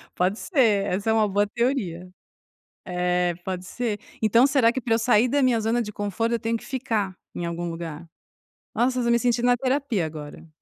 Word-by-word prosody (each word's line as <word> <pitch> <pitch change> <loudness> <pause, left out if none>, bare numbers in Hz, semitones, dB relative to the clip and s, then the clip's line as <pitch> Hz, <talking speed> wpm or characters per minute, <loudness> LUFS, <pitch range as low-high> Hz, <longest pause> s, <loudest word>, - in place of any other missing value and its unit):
Pode 185 +4 +1
ser, 225 - +2
essa 200 +4 -1
é - - +3
uma 220 -1 +3
boa 205 +1 +1
teoria. 205 -7 -2 0.8
É. 180 -1 0
Pode 185 -1 -4
ser. 220 -1 -3 0.2
Então 230 +4 +5
será 250 -4 +4
que 260 - -3
pra 230 -2 +1
eu - - +2
sair 235 0 +3
da 285 +3 +1
minha 245 -3 +3
zona 225 +2 +1
de 210 -3 -4
conforto, 205 +3 -2
eu 235 - 0
tenho 230 +1 -1
que - - -9
ficar 225 -8 -2 0.2
em 170 - -3
algum 170 0 -3
lugar? 165 -1 -7 0.7
Nossa, 250 +1 +1
eu - - +1
estou 235 - +1
me 235 - +4
sentindo 240 0 +1
na 245 0 +4
terapia 255 - 0
agora. 150 +1 -9
220 Hz, 205 wpm, -24 LUFS, 180-240 Hz, 0.8 s, Então